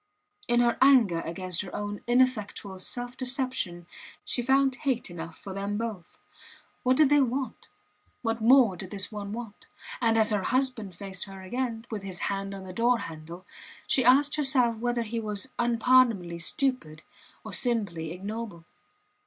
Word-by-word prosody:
In 240 0 +4
her 235 -1 +2
anger 245 -11 +5
against 180 +1 -2
her 195 - -8
own 205 0 -4
ineffectual 240 -6 +1
self 245 +5 -4
deception 255 -9 -2 0.4
she 245 - -1
found 265 +1 +2
hate 255 -9 -1
enough 165 -1 -8
for 195 - -8
them 200 +1 -3
both. 220 -6 -6 0.6
What 255 +1 +2
did 305 -3 +6
they 290 -1 +6
want? 260 +1 -2 0.6
What 225 -1 -1
more 235 -4 +6
did 185 +1 -8
this 200 +1 -2
one 205 -1 -6
want? 225 -2 -8 0.3
And 225 -1 +3
as 220 0 +4
her 205 -2 +1
husband 240 -4 -1
faced 190 0 -6
her 195 -1 -10
again, 230 +2 -3
with 215 -2 -3
his 190 -2 -5 0.2
hand 195 0 -4
on 195 - -8
the 185 -1 -8
door 240 +4 +3
handle, 165 -1 -8 0.4
she 260 - +2
asked 285 +5 +5
herself 260 -6 +2
whether 240 +1 -1
he 230 +1 -3
was 215 +3 -1
unpardonably 235 -7 +3
stupid, 165 - -1 0.4
or - - -7
simply 200 -10 +1
ignoble. 200 -1 -6
225 Hz, 160 wpm, -28 LUFS, 190-250 Hz, 0.6 s, did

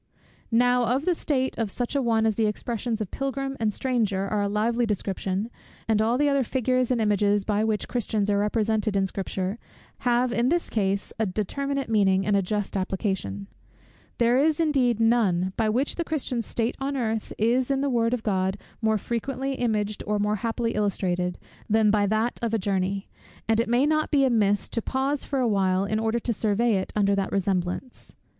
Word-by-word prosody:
Now 245 +1 +3
of 275 - -2
the 365 - +3
state 265 -5 -1
of 225 -3 0
such 245 +6 -3
an 275 - +2
one 225 -2 +2
the 220 0 +2
expressions 225 +1 -3
of 205 - -4
Pilgrim 275 0 -3
and 220 -2 +1
Stranger 210 -6 0
are 210 0 0
a 200 - 0
lively 230 +4 +1
description; 195 +1 -2 0.4
and 220 -1 +2
all 230 +3 +2
the 290 +2 +2
other 280 -1 +2
figures 255 0 0
and 250 -2 +1
images, 205 -1 +2
by 210 0 +1
which 220 -1 0
Christians 215 -4 -1
are 200 -1 +2
represented 215 0 0
in 195 -1 +2
Scripture, 190 +2 -3 0.4
have 245 0 +1
in 240 +2 +2
his 345 +2 0
case 200 -2 -1
a 220 - +1
determinate 275 +8 -2
meaning 195 -4 +2
and 205 - +2
a 200 - +3
just 205 +2 -2
application. 190 - -2 0.7
There 240 +2 +3
is 305 +2 +2
indeed 265 -8 +2
none, 200 -6 +2
by 220 -1 +1
which 255 +6 0
the 340 - 0
Christian's 265 -8 -3
state 230 +1 -1
on 275 +1 -2
earth 225 -3 -2
is 240 +4 +2
in 275 -1 +1
the 280 - +1
word 235 -2 +2
of 230 - -8
God 190 -2 0 0.2
more 220 -1 +2
frequently 265 +5 -3
imaged, 215 -5 -1
or 210 0 +1
more 210 +1 0
happily 230 +1 -1
illustrated, 180 -3 -1 0.3
than 215 -1 +4
by 205 -1 +2
that 220 +3 0
of 230 -1 0
a - - +3
journey: 195 0 -1 0.4
and 225 0 +2
it 230 - 0
may 245 +4 +3
not 310 0 +1
be 280 -2 +3
amiss 210 -5 +2
to 230 - -1
pause 270 +4 -1
for 275 - -2
a 255 -2 +2
while 190 -2 +2
in 215 +2 -1
order 225 +1 0
to 235 0 -1
survey 215 +1 +1
it 190 - -3
under 200 -1 +3
that 195 -1 -1
resemblance. 190 +5 -2
220 Hz, 195 wpm, -25 LUFS, 200-245 Hz, 0.7 s, than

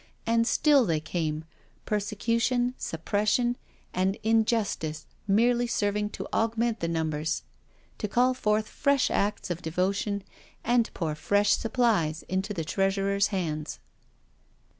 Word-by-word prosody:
And 230 0 +2
still 285 -1 +4
they 165 -7 +1
came, 160 -1 -3 0.4
persecution, 230 +4 0
suppression, 210 +8 0 0.4
and 190 +2 +1
injustice 220 -9 +1 0.2
merely 240 +4 +3
serving 210 -2 0
to - - -5
augment 225 0 +1
the 170 - -1
numbers 160 -1 -1 0.3
— - - -35
to - - -1
call 250 +5 +3
forth 215 -3 0
fresh 280 -2 +1
acts 205 -2 -1
of 175 0 -3
devotion, 190 +4 -1 0.4
and 240 -1 +2
pour 160 -4 -1
fresh 205 +6 +2
supplies 220 -10 +1
into 190 +3 -2
the 165 -6 -3
treasurer's 195 +2 +1
hands. 160 -6 -3
205 Hz, 120 wpm, -27 LUFS, 170-230 Hz, 0.4 s, still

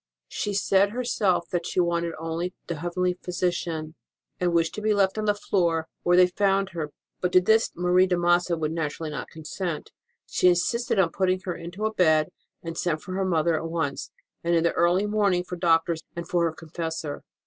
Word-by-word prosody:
She 205 -1 -3
said 195 0 +3
her 250 +4 -3
self 190 -7 +1
that 175 -1 -1
she - - -1
wanted 170 -1 0
only 165 +3 -3
the 170 - -4
heavenly 180 +2 -1
Physician, 175 -1 -1
HOW 155 -1 -3
ROSE - - -7
OF 155 - -13
ST. - - -48
MARV - - -57
DIED 180 - 0
and 175 - +1
wished 165 -1 +2
to 215 - -5
be 215 0 +2
left 195 0 +2
on 215 - -1
the 210 - +3
floor, 170 -5 0
where 175 0 +3
they 180 - +8
found 195 +1 +1
her; 160 -5 -5 0.3
but 180 - 0
to 185 - +8
this 220 +5 +3
Marie 180 +2 +3
de 180 -1 +1
Massa 175 0 +2
would 155 -1 -1
naturally 160 -1 -3
not 140 -4 -5
consent. 160 +1 -5 0.3
She - - +2
insisted 190 +8 +2
on 180 -4 +3
putting 185 0 +1
her 185 -1 -3
into 175 +5 -5
a 220 - -1
bed, 155 -5 +3 0.3
and 165 -1 -5
sent 165 -2 -1
for 185 - -6
her 190 +1 0
mother 170 -2 +2
at 165 +1 -3
once, 160 -4 -2 0.3
and 170 0 +2
in 165 - +3
the 170 - +2
early 175 +4 +3
morning 205 -4 +1
for 180 - -6
doctors 165 -1 +2
and 170 0 -5
for 175 -1 +1
her 165 - 0
confessor. 160 -1 -5
175 Hz, 225 wpm, -26 LUFS, 165-185 Hz, 0.3 s, they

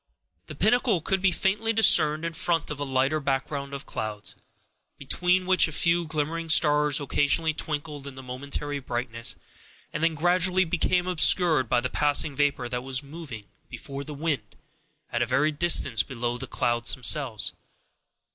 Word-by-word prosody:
The 155 - -9
pinnacle 220 - +2
could 190 +4 -1
be 190 -1 +3
faintly 205 +6 0
discerned 160 -7 +4
in 165 - -4
front 165 -2 -1
of 145 - -6
a - - -2
lighter 135 +2 0
background 140 0 -3
of 140 -1 -7
clouds, 105 -1 -5 0.6
between 180 +6 0
which 185 -2 +4
a - - -7
few 170 +2 +1
glimmering 160 +2 -3
stars 150 -2 +4
occasionally 145 +3 0
twinkled 150 -2 -5
in 140 - -9
momentary 140 +3 -5
brightness, 120 -3 -4 0.6
and - - -3
then 165 -1 +1
gradually 180 +3 +2
became 175 +2 0
obscured 165 - +3
by 120 - +2
the 130 - -1
passing 145 +2 +2
vapor 140 -3 0
that 125 0 -4
was 130 +1 -4
moving 140 -7 -9 0.2
before 135 +3 -7
the 150 0 -8
wind, 140 -8 -3 0.6
at 120 - -1
a 120 - 0
vast 145 +4 0
distance 140 -8 +4
below 120 -2 -4
the 130 +2 -7
clouds 120 +1 0
themselves. 130 -2 0
145 Hz, 155 wpm, -25 LUFS, 130-165 Hz, 0.6 s, discerned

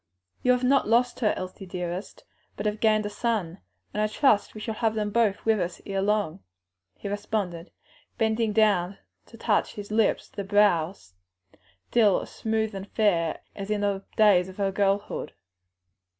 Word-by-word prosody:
"You 250 - +3
have 250 0 -1
not 270 +2 +3
lost 240 +2 +2
her, 215 -4 +3
Elsie 185 +1 -7
dearest, 180 +2 -5 0.3
but 205 - -4
have 210 0 -1
gained 215 -1 +3
a - - -2
son; 205 -6 -2 0.3
and 210 - -1
I 215 - +2
trust 215 -2 +2
we - - -6
shall 220 +1 -3
have 220 0 0
them 210 -1 -1
both 210 -3 +1
with 220 -1 +3
us 175 -1 -3
ere 195 -1 -2
long," 205 - 0 0.6
he - - -6
responded, 200 -4 -3 0.5
bending 220 0 +1
down 205 -4 +2 0.3
to 230 - -14
touch 220 -2 0
his 205 0 -7
lips 220 0 +2
to - - -29
the 200 - -2
brow 195 -4 +3
still 95 - -2
as - - -10
smooth 220 -1 -1
and 195 +1 -7
fair 175 -7 +1
as 200 0 -6
in 210 -1 0
the 200 -1 -1
days 195 -4 +5
of 185 - -12
her 195 -1 0
girlhood. 200 +1 -1
205 Hz, 175 wpm, -26 LUFS, 190-220 Hz, 0.6 s, days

